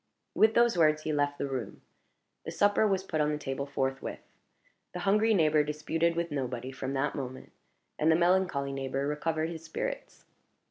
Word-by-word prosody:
With 220 +1 +4
those 235 -6 +4
words 155 -1 +3
he 155 - -1
left 145 0 0
the - - -2
room. 130 -6 -5 0.6
The - - -6
supper 205 +1 +3
was 190 -2 0
put 160 -5 -1
on 150 - +2
the 150 - -1
table 140 -1 -4
forthwith. 135 -1 -3 0.7
The 180 - -5
hungry 215 +4 +3
neighbor 155 -3 +4
disputed 160 +3 -1
with 170 -1 -2
nobody 130 -2 -3
from 135 0 -5
that 140 +1 0
moment, 130 -2 -6 0.5
and 155 +2 +4
the - - +5
melancholy 175 -5 +2
neighbor 135 0 -2
recovered 155 +2 -1
his 165 -1 -8
spirits. - - -5
155 Hz, 175 wpm, -29 LUFS, 140-175 Hz, 0.7 s, the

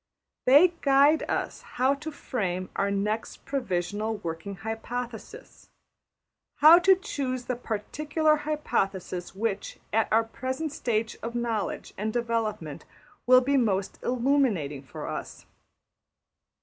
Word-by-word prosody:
They 290 +8 +7
guide 280 +3 +5
us - - -2
how 260 +3 +1
to 300 +3 -6
frame 185 -10 -3
our 200 0 +1
\emph{next 210 +2 -2
provisional 215 -4 -2
working 170 +1 -5
hypothesis}, 235 - -7 0.9
how 320 +4 +8
to 380 +2 +6
choose 255 -8 -4
the 250 - -2
particular 300 +8 0
hypothesis 195 - -2
which 205 -1 -3 0.2
at 225 0 +2
our 225 +1 +4
present 260 +7 -4
stage 225 -4 -2
of 235 +1 -5
knowledge 230 -4 -2
and 215 +2 -1
development 225 -9 -2 0.4
will 255 0 +8
be 275 +2 +2
most 200 -6 0
illuminating 240 - +1
for 135 - -8
us. - - -6
235 Hz, 115 wpm, -27 LUFS, 200-275 Hz, 0.9 s, how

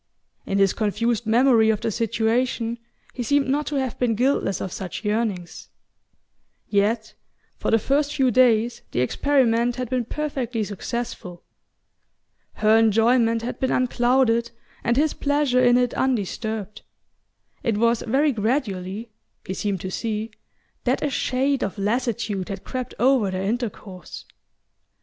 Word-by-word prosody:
In 195 - 0
his 195 -1 +3
confused 225 +1 -1
memory 230 -1 +4
of 215 -2 +1
the 225 - -1
situation 230 +1 0 0.3
he 250 - -5
seemed 285 +3 +2
not 290 +3 0
to 295 - -2
have 265 -3 -2
been 240 -3 +1
guiltless 245 -5 +1
of 190 - -4
such 190 +3 -6
yearnings...Yet 210 +1 -4 0.5
for - - -1
the 225 - +5
first 285 +6 0
few 265 -3 +3
days 235 -1 +3
the 125 - +1
experiment 240 - +2
had 250 -2 -5
been 250 -2 0
perfectly 255 -5 -3
successful. 205 -3 -5 1.1
Her 215 +1 +4
enjoyment 225 +1 +3
had 245 - -4
been 260 - 0
unclouded 245 -1 +2 0.3
and 235 +1 +1
his 305 +1 +2
pleasure 285 -3 +1
in 245 0 +5
it 245 -1 +1
undisturbed. 220 -3 -2 0.8
It 230 -5 0
was 230 +1 +2
very 280 +6 +2
gradually 215 -3 -2 0.3
he 190 - -4
seemed 195 -1 -2
to 185 - -5
see 220 +1 -3 0.5
that - - 0
a 290 - 0
shade 265 +2 0
of 195 - -3
lassitude 210 -2 -1
had 195 -1 -6
crept 255 -1 -5
over 245 -3 +3
their 185 0 -3
intercourse. 205 -5 -5
230 Hz, 135 wpm, -23 LUFS, 210-255 Hz, 1.1 s, the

